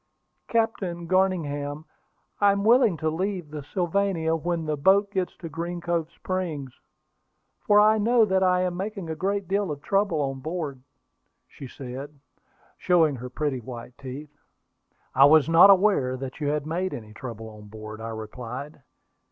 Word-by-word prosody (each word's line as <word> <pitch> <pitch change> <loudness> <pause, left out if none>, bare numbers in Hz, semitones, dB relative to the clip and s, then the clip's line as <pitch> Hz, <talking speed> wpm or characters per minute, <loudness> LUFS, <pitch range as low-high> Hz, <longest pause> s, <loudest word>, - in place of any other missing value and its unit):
"Captain 195 -7 -1
Garningham, 155 -5 0 0.5
I 205 -1 +5
am 200 0 -2
willing 225 -5 +4
to 155 +1 -1
leave 180 -2 -3
the 150 -1 -5
Sylvania 175 0 0
when 165 0 -2
the 155 -1 -1
boat 195 +7 +3
gets 185 -2 -2
to 170 - -7
Green 170 +2 -4
Cove 170 -1 -1
Springs, 170 -8 -4 0.9
for 205 0 +4
I 215 +1 +5
know 230 +1 +4
that 190 -2 +1
I 180 -1 +3
am 180 -1 -1
making 195 -3 -4
a - - -3
great 200 +2 -2
deal 200 0 0
of 145 -1 -5
trouble 195 -5 +1
on 135 -2 -2
board," 155 -3 -4 0.7
said 135 - -9
she, 130 +2 -7 0.7
showing 165 -6 +3
her 125 +1 -7
pretty 140 0 -2
white 120 0 -9
teeth. 140 +3 -8 0.8
"I 135 - +7
was 155 0 +6
not 165 +4 +8
aware 185 -10 +4
that 130 +1 -7
you 150 - -2
had 150 0 -1
made 180 +4 -2
any 110 -2 -10
trouble 115 -2 -8
on 105 -1 -13
board," 110 +1 -9
I 115 - -5
replied. 120 +6 -7
160 Hz, 160 wpm, -25 LUFS, 135-190 Hz, 0.9 s, not